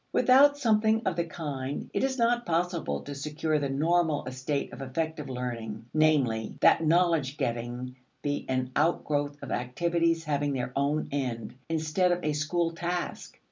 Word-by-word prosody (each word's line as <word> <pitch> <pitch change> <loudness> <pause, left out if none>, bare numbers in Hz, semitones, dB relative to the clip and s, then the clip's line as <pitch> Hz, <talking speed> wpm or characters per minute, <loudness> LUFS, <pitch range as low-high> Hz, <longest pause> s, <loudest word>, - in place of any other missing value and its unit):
Without 285 +3 +6
something 220 -3 +2
of 190 - +1
the 170 0 0
kind, 145 -5 -5
it - - 0
is 265 0 0
not 240 0 +2
possible 175 -1 -1
to 145 - -6
secure 150 +2 -1
the 140 -1 -2
normal 160 +2 +1
estate 130 +3 -3
of - - -8
effective 150 +2 -3
learning; 115 -4 -5
namely, 140 -8 +2
that - - +5
knowledge 160 -4 +2
getting 120 +2 -3 0.3
be 145 0 -1
an 130 0 -1
outgrowth 145 -2 +1
of - - -6
activities 165 +6 0
having 145 -2 0
their 125 -1 -3
own 145 +2 0
end, 125 -6 -3 0.2
instead 165 +3 +1
of 175 0 -1
a 150 - 0
school 165 +3 0
task. 175 +1 -4
155 Hz, 155 wpm, -28 LUFS, 130-170 Hz, 0.3 s, Without